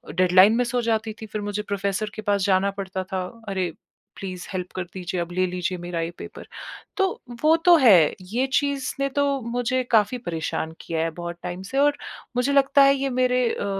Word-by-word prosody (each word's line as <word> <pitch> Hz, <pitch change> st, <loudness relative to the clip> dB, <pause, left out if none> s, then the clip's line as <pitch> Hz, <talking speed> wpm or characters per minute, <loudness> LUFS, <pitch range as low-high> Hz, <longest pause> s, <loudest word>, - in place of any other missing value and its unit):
Deadline 185 Hz, +4 st, +6 dB
miss 245 Hz, 0 st, -1 dB
जाती 220 Hz, -1 st, 0 dB
थी -, -, -5 dB
फिर 210 Hz, 0 st, -5 dB
मुझे 205 Hz, 0 st, -3 dB
प्रोफ़ेसर 200 Hz, +1 st, -2 dB
के -, -, -5 dB
पास 205 Hz, -1 st, +1 dB
जाना 195 Hz, 0 st, +2 dB
पड़ता 190 Hz, -1 st, -3 dB
था। 185 Hz, -1 st, -1 dB, 0.3 s
अरे 185 Hz, -3 st, -1 dB, 0.5 s
प्लीज 185 Hz, -2 st, -6 dB
हेल्प 180 Hz, -1 st, -4 dB
कर 185 Hz, -, -2 dB
दीजिए 180 Hz, -1 st, -3 dB
अब 170 Hz, +1 st, -5 dB
ले 185 Hz, +1 st, +2 dB
लीजिए 180 Hz, 0 st, -3 dB
मेरा 175 Hz, -1 st, -4 dB
ये 165 Hz, +1 st, -3 dB
पेपर। -, -, -9 dB, 0.5 s
तो 390 Hz, -1 st, +3 dB, 0.3 s
वो 315 Hz, +1 st, +6 dB
तो 350 Hz, -1 st, +8 dB
हैं 195 Hz, -, +6 dB, 0.2 s
ये 255 Hz, +3 st, +1 dB
चीज़ 280 Hz, -2 st, 0 dB
ने 275 Hz, -, +1 dB
तो 280 Hz, -1 st, +1 dB
मुझे 245 Hz, +2 st, -1 dB
काफ़ी 225 Hz, +2 st, +3 dB
परेशान 160 Hz, -1 st, -3 dB
किया 165 Hz, -1 st, -3 dB
हैं 165 Hz, 0 st, -1 dB
बहुत 175 Hz, 0 st, -6 dB
टाइम 180 Hz, +1 st, -5 dB
से 270 Hz, -, -2 dB
और 290 Hz, 0 st, +3 dB, 0.4 s
मुझे 255 Hz, +3 st, +1 dB
लगता 275 Hz, 0 st, +5 dB
हैं 275 Hz, 0 st, +6 dB
ये 275 Hz, 0 st, -1 dB
मेरे 250 Hz, -1 st, +2 dB
अ, -, -, -3 dB
205 Hz, 200 wpm, -24 LUFS, 180-255 Hz, 0.5 s, तो